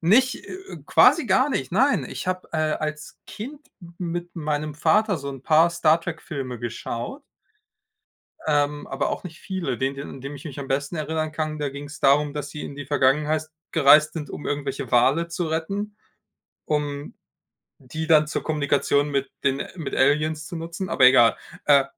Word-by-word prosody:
nicht 235 +10 +3
äh, - - -9 0.2
äh, - - -6
quasi 335 - +5
gar 260 +3 +3
nicht, 135 - -2
nein. 265 +8 +3
Ich - - -6
habe, 185 0 -2
äh, - - -1 0.2
als 155 0 -4
Kind 275 +8 -8 0.2
m 170 -1 -13
mit 175 0 -4
meinem 150 -1 -2
Vater 205 +6 +2
so 140 0 -6
'n 135 -2 -9
paar 160 +3 +5
Star-Trek-Filme 160 -6 -1
geschaut 120 - -5 1.3
ähm, 145 -1 +1
aber - - -1
auch - - -4
nicht 165 -3 -9
viele. 175 -10 -3
Den 135 +1 -1
den, 140 +1 -7
an 135 - -10
den 140 +2 -6
ich 140 - -12
mich 145 -3 -7
am 135 - -6
besten 140 +4 -1
erinnern 155 0 -2
kann, 155 -1 -3
da 145 -2 -1
ging's 145 +2 -9
darum, 145 +1 +3
dass 145 -1 -4
sie 150 - -7
in 140 - -7
die 145 -1 -7
Vergangenheit 150 +3 +1 0.2
gereist 150 +2 +6
sind, 150 -4 -5
um - - -7
irgendwelche 140 -3 -3
Wale 135 +8 +4
zu 170 0 -3
retten, 200 +6 -3 0.7
um 145 -1 -2 0.7
die 155 +5 -5
dann 155 -1 +5
zur 150 - -3
Kommunikation 145 -1 +1
mit 140 -1 -1
den 140 0 +1
mit 160 -5 -4
Aliens 150 +3 +2
zu 170 - -6
nutzen, 170 +3 -5
aber 130 - +3
egal. 120 -3 +6 0.3
Äh, 140 -2 +6
150 Hz, 180 wpm, -24 LUFS, 140-170 Hz, 1.3 s, gereist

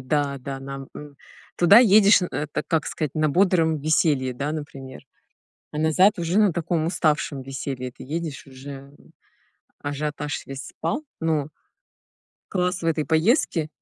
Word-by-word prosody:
да, 140 +1 -1
да. 135 +1 -6
Нам, 135 0 -8
м, 145 -1 -10 0.4
туда 185 +6 +7
едешь, 210 -3 +6
э, - - 0
эт 150 0 -3 0.2
как 160 -2 0
сказать, 155 -4 -3
на 155 -1 +2
бодром 170 -1 +3
веселье, 145 -4 +1
да, 140 +4 -3
например, 140 -4 -7 0.7
а 150 - -4
назад 180 +6 +3
уже 170 +4 +1
на 210 -4 +4
таком 165 -1 -1
уставшем 150 -5 0
веселье 135 -1 -5
ты - - -12
едешь, 155 +1 -5
уже, 135 +1 -11 0.3
м, - - -22 0.7
ажиотаж 145 0 -4
весь 135 0 -7
спал, 295 +4 -3 0.2
но 155 -3 0 1.0
Класс 180 0 -1
в - - -2
этой 160 -2 +1
поездке. 160 - +2
155 Hz, 150 wpm, -24 LUFS, 140-170 Hz, 1.0 s, туда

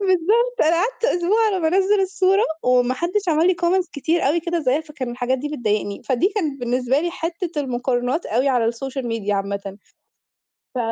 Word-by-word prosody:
بالضبط، 420 +7 +2
أنا 320 +2 +3
قعدت 460 +7 -1
أسبوع 425 +2 +2
على 395 -3 +1
ما 320 - +2
أنزل 390 +4 +3
الصورة، 385 +1 +2 0.2
وما 250 0 +3
حدش 355 +6 -2
عمل 320 +2 +3
لي 370 - +4
comments 355 0 +2
كتير 320 +3 0
أوي 335 +4 +1
كده 340 +1 -2
زيها، 270 +1 +1
فكان 300 -6 -6
الحاجات 250 +1 -1
دي 295 - -4
بتضايقني. 215 -7 -2
فدي 275 +9 +1
كانت 300 -10 -2
بالنسبة 250 +3 0
لي 345 +1 -1
حتة 335 -2 -4
المقارنات 250 +3 -1
أوي 250 +5 +1
على 240 -3 +2
الSocial 270 +3 -5
Media 230 -3 -3
عامةً. 200 -1 -3 1.0
ف - - -3
305 Hz, 180 wpm, -21 LUFS, 250-365 Hz, 1.0 s, لي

